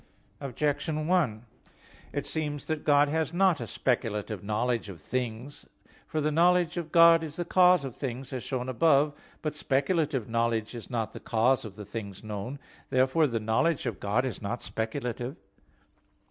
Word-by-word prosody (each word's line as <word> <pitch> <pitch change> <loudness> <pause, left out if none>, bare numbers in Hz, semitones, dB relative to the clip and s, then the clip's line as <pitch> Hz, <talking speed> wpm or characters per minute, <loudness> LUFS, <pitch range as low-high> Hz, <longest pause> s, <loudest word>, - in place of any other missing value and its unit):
Objection 150 +3 -1
1: 145 -11 +1 0.7
It - - -3
seems 150 -3 -3
that 155 -2 -3
God 145 -1 +5
has 160 0 -1
not 185 -4 +3
a - - -4
speculative 110 -5 -1
knowledge 110 +2 -1
of 90 -4 -9
things. 125 - -4 0.4
For 155 - -2
the 155 0 +1
knowledge 175 +1 +3
of 170 -3 -4
God 165 -1 +7
is 155 -1 -6
the 175 - -3
cause 180 -5 +5
of 130 - -6
things, 135 0 -5
as 125 - -4
shown 125 -2 -3
above 145 +2 +4
(A. - - -14
8). - - -24 0.3
But 155 - -1
speculative 145 - 0
knowledge 115 -1 0
is 120 -2 -8
not 115 -3 -2
the - - -7
cause 120 +3 +2
of 100 -3 -8
the 105 -1 -8
things 100 -2 -7
known. 110 +5 -5 0.3
Therefore 130 +5 +3
the 115 -3 -1
knowledge 110 +10 +1
of 115 -5 -3
God 105 +6 +1
is 130 - -4
not 115 +4 -3
speculative. 120 +3 -3
130 Hz, 175 wpm, -28 LUFS, 115-155 Hz, 0.7 s, God